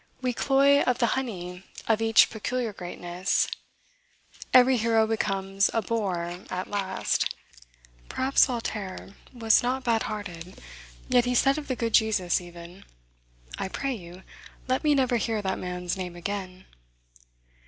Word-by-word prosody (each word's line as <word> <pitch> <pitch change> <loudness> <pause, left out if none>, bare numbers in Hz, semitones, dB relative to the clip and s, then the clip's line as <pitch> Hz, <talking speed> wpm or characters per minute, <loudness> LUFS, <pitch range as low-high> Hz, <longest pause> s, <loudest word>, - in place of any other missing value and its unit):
We 255 -1 -1
cloy 280 +3 +4
of 250 -1 +1
the 240 - +2
honey 180 -9 -4 0.3
of 225 -1 +2
each 225 0 +5
peculiar 230 +1 -3
greatness. 175 0 -2 1.0
Every 255 0 +6
hero 225 -1 +3
becomes 195 -3 0
a 225 - +1
bore 180 -6 -2
at 185 0 -4
last. 195 -2 -1 0.8
Perhaps 265 +1 +3
Voltaire 210 -6 -5 0.2
was 225 -3 +3
not 255 +2 -1
bad 230 -2 +1
hearted, 185 -4 -7 0.5
yet 245 -1 +3
he 250 0 0
said 275 +4 +3
of 295 - -9
the 255 - -1
good 230 -2 -2
Jesus, 210 -6 +2
even, 175 +1 -12 0.8
"I - - -2
pray 270 +7 -3
you, 180 -3 -10 0.4
let 255 0 0
me 300 -1 +4
never 255 -3 +2
hear 225 0 -1
that 190 -1 -2
man's 180 -1 -3
name 180 -2 -6
again." 185 0 -5
215 Hz, 140 wpm, -26 LUFS, 185-245 Hz, 1.0 s, Every